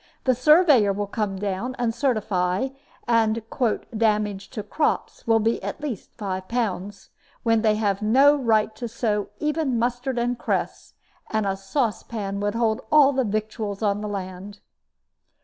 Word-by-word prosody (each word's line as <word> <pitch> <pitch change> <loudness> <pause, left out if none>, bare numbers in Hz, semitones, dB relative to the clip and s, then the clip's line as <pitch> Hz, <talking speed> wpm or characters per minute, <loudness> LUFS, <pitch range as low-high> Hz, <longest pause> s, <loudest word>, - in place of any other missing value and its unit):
The 260 - +3
surveyor 285 - +5
will 205 +1 -2
come 205 -1 -2
down 200 +6 -3
and 235 -2 0
certify, 215 -4 0 0.4
and 225 -2 +3 0.2
the 240 -5 0
'damage 210 -2 0
to 215 -5 -5
crops' 260 +3 -2
will 225 -1 +4
be 225 +2 0
at - - -5
least 285 -9 -5
five 190 -3 -4
pounds, 205 -4 -3 0.3
when 225 -1 +3
they 215 -1 +3
have 205 -2 0
no 270 +7 +5
right 220 -5 +1
to 240 - -4
sow 215 -2 -1
even 300 -3 0
mustard 245 +2 -1
and 240 0 -1
cress, - - -3 0.3
and 215 -1 0
a 195 -1 0
saucepan 200 -1 -2
would 205 +1 -1
hold 230 +1 +1
all 285 -2 +6
the 265 0 +1
victuals 215 -1 -3
on 205 0 +1
the 210 - -3
land." 195 0 -6
220 Hz, 155 wpm, -24 LUFS, 205-245 Hz, 0.4 s, all